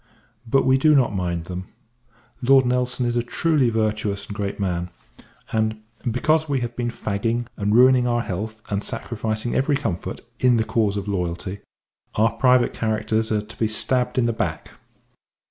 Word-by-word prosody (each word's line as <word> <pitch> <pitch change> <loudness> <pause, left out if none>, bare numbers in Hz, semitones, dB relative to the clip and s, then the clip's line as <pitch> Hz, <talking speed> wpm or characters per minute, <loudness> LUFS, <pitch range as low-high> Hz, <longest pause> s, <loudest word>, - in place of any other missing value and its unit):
But 135 +4 +3
we 130 0 +4
do 155 +2 +5
not 125 -6 +3
mind 85 -3 -2
them. 90 +1 -6 0.8
Lord 130 +1 +5
N. 125 - +1
is 125 -1 0
a - - +3
truly 140 +2 +2
virtuous 105 -2 -1
and 100 - -8
great 100 -1 -3
man; 90 -3 -1 0.6
and, 110 -1 0 0.3
because 155 +6 +1
we 135 -3 0
have 120 0 -4
been 120 -1 -2
fagging, 115 +2 -2
and 105 +1 0
ruining 125 0 +6
our 120 0 +1
health, 110 +3 -5
and 100 0 -1
sacrificing 110 0 -2
every 140 +2 +2
comfort, 95 -11 -4 0.2
in 125 -2 +4
the 110 - +2
cause 105 -3 0
of 100 0 -4
loyalty, 95 0 -3 0.6
our 110 +2 +3
private 125 -2 +3
characters 110 0 -1
are 105 -1 +1
to 110 - -13
be 110 - +2
stabbed 125 +4 0
in 125 - +3
the 115 - +1
dark. - - -3
110 Hz, 170 wpm, -23 LUFS, 105-125 Hz, 0.8 s, ruining